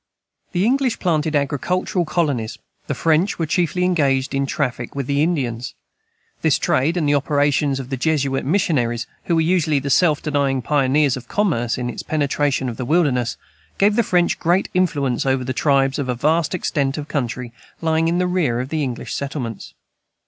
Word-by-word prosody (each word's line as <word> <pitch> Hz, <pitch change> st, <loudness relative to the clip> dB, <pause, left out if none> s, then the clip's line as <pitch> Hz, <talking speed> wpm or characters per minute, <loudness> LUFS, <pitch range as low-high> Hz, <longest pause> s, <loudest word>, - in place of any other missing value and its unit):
The 180 Hz, +2 st, +1 dB
English 255 Hz, -1 st, +1 dB
planted 155 Hz, -3 st, 0 dB
agricultural 170 Hz, +6 st, 0 dB
colonies 140 Hz, -10 st, -1 dB, 0.3 s
the 140 Hz, -, -2 dB
French 165 Hz, +7 st, +1 dB
were 165 Hz, -, -1 dB
chiefly 180 Hz, +3 st, 0 dB
engaged 140 Hz, -7 st, +1 dB
in 135 Hz, 0 st, 0 dB
traffic 120 Hz, -1 st, -3 dB
with 140 Hz, -2 st, -2 dB
the 140 Hz, +2 st, 0 dB
Indians. 125 Hz, -8 st, -1 dB, 0.7 s
This -, -, +3 dB
trade, 155 Hz, +7 st, +1 dB
and 155 Hz, -4 st, +1 dB
the 145 Hz, -, +3 dB
operations 145 Hz, -1 st, +1 dB
of 130 Hz, 0 st, -7 dB
the 135 Hz, -, -1 dB
Jesuit 135 Hz, -1 st, 0 dB
missionaries, 130 Hz, -, 0 dB, 0.2 s
who 170 Hz, -, +1 dB
were 160 Hz, -, +3 dB
usually 160 Hz, -3 st, +2 dB
the 140 Hz, 0 st, -2 dB
self 155 Hz, +1 st, +4 dB
denying 140 Hz, -4 st, 0 dB
pioneers 140 Hz, 0 st, +2 dB
of 125 Hz, -1 st, -10 dB
commerce 145 Hz, -, 0 dB
in 125 Hz, -1 st, -3 dB
its 120 Hz, -, -5 dB
penetration 145 Hz, -3 st, 0 dB
of 120 Hz, -, -5 dB
the 125 Hz, -, -3 dB
wilderness, 140 Hz, -6 st, +1 dB, 0.4 s
gave 205 Hz, +1 st, +3 dB
the 235 Hz, -, +4 dB
French 180 Hz, -5 st, +1 dB
great 175 Hz, +3 st, +1 dB
influence 145 Hz, -9 st, +1 dB
over 130 Hz, -1 st, +1 dB
the 130 Hz, +1 st, -3 dB
tribes 135 Hz, 0 st, +2 dB
of 135 Hz, -2 st, -2 dB
a 125 Hz, -, 0 dB
vast 160 Hz, +7 st, +1 dB
extent 140 Hz, -5 st, -1 dB
of 150 Hz, -1 st, -5 dB
country 125 Hz, -4 st, -3 dB, 0.3 s
lying 160 Hz, 0 st, +1 dB
in 170 Hz, +1 st, +1 dB
the 180 Hz, -, +1 dB
rear 170 Hz, -10 st, 0 dB
of 130 Hz, +1 st, -4 dB
the 155 Hz, 0 st, -1 dB
English 130 Hz, -4 st, -4 dB
settlements. 135 Hz, -5 st, -5 dB
145 Hz, 180 wpm, -20 LUFS, 130-165 Hz, 0.7 s, self